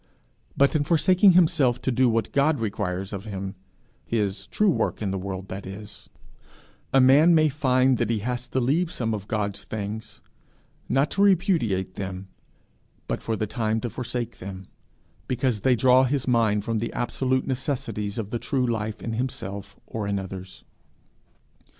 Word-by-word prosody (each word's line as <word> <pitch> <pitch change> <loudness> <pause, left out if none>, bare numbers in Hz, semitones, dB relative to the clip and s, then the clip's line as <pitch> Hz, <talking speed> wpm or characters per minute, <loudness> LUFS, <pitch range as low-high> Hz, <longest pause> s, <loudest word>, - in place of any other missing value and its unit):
But 140 +3 +4
in 150 - +3
forsaking 185 +5 +5
himself 155 -8 +4
to 130 - +1
do 130 0 +3
what 115 0 0
God 140 +1 +2
requires 95 -3 -3
of 100 +1 -5
him 95 -2 -5 0.5
his 100 -3 -2
true 210 - +2
work - - -1
in 100 -3 -2
the 95 - -2
world, 95 0 -5
that 95 0 -6
is, 100 +2 -10 0.8
a 135 - +5
man 145 +6 +6
may 155 -1 +4
find 130 -3 +2
he 115 - +1
has 125 +3 -3
to 130 - -1
leave 155 +8 +1
some 115 -7 -2
of 105 -1 -5
God's 105 -2 -2
things 110 +1 -6 0.7
not 140 +2 +2
to 195 - 0
repudiate 165 - +2
them, 95 -1 -5 0.8
but - - -2
for 110 - -2
the 110 - -1
time 110 0 -1
to 120 - -4
forsake 120 0 -4
them, 95 0 -8 0.6
because 125 -3 0
they 125 +4 +3
draw 130 +2 +5
his 135 0 -1
mind 110 -4 +2
from 115 0 -1
the 115 - -3
absolute 130 +1 0
necessities 125 -6 -3
of 105 -3 -4
the 120 - -2
true 130 -1 0
life 110 -2 -3
in 115 - -3
himself 100 -5 -4
or 110 -3 -4
in 100 0 0
others. 95 -1 -7
115 Hz, 165 wpm, -25 LUFS, 100-130 Hz, 0.8 s, man